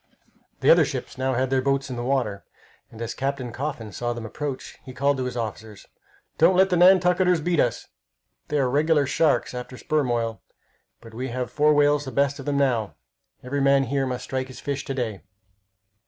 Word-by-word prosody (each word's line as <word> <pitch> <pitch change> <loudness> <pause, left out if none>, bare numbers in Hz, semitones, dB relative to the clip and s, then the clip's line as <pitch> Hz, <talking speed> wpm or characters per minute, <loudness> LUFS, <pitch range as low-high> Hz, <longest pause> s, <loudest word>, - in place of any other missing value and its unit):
The - - +6
other - - +7
ships - - -5
now 130 0 -1
had 130 +1 0
their 135 -1 +2
boats 135 0 0
in - - -4
the 120 - -4
water, 120 -7 -1 0.5
and 110 - -14
as 115 - -4
Captain 135 -2 -3
Coffin 130 -4 -5
saw 120 +4 -3
them 120 -1 -7
approach 140 +4 -6
he 130 - -10
called 140 +1 +1
to 130 - -2
his 125 -1 -4
officers: 110 -2 -6 0.5
"Don't 170 +3 +5
let 190 +1 +4
the - - +3
Nantucketers 180 0 +5
beat 170 +1 0
us! 120 - 0 0.6
They 150 - -1
are 135 -3 +2
regular 150 +2 +2
sharks 145 +1 +1
after 125 +1 -7
sperm 150 -2 0
oil, 115 -2 -1 0.6
but 115 -1 -13
we 125 +3 -4
have 125 0 -4
four 150 0 +3
whales 145 0 +3
the 130 - -6
best 140 +1 +1
of 135 - -9
them 145 -1 0
now. 120 -7 0 0.5
Every 140 +3 -2
man 140 0 +4
here 135 +1 -1
must 125 -1 -4
strike 130 0 -3
his 130 - -11
fish 140 -1 -3
to 135 -1 -4
day." 115 -6 -3
135 Hz, 200 wpm, -24 LUFS, 125-145 Hz, 0.6 s, other